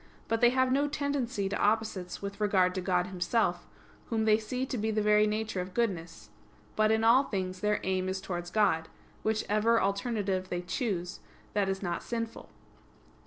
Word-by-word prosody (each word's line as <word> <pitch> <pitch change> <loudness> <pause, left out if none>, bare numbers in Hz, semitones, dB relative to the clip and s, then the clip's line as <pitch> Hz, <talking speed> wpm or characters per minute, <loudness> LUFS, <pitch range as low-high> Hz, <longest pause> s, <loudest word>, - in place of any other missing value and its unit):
But 225 0 0
they 240 - +7
have 260 +1 +2
no 280 +2 +2
tendency 280 -8 -1
to 195 - -2
opposites 205 -4 0
with 200 +1 -6
regard 190 -3 +3
to 185 - -2
God 180 -1 +1
Himself, 180 0 0 0.4
Whom 220 -2 0
they 215 0 +5
see 250 +4 -3
to 260 - -4
be 220 -1 -1
the 215 0 0
very 210 0 +4
nature 215 -2 -2
of 180 0 -8
goodness; 165 - -2 0.4
but 215 0 +3
in 220 0 +2
all 245 +5 +6
things 185 -4 -3
their 210 +1 +1
aim 185 0 0
is 190 0 -2
towards 175 -2 -5
God, 180 -6 +2 0.3
which 220 0 0
ever 220 +2 +3
alternative 200 -2 -1
they 175 0 -3
choose, 180 -3 -3 0.3
that 200 -2 +1
is 195 +1 -2
not 175 -2 -2
sinful. 230 -1 -5
210 Hz, 180 wpm, -30 LUFS, 185-225 Hz, 0.4 s, they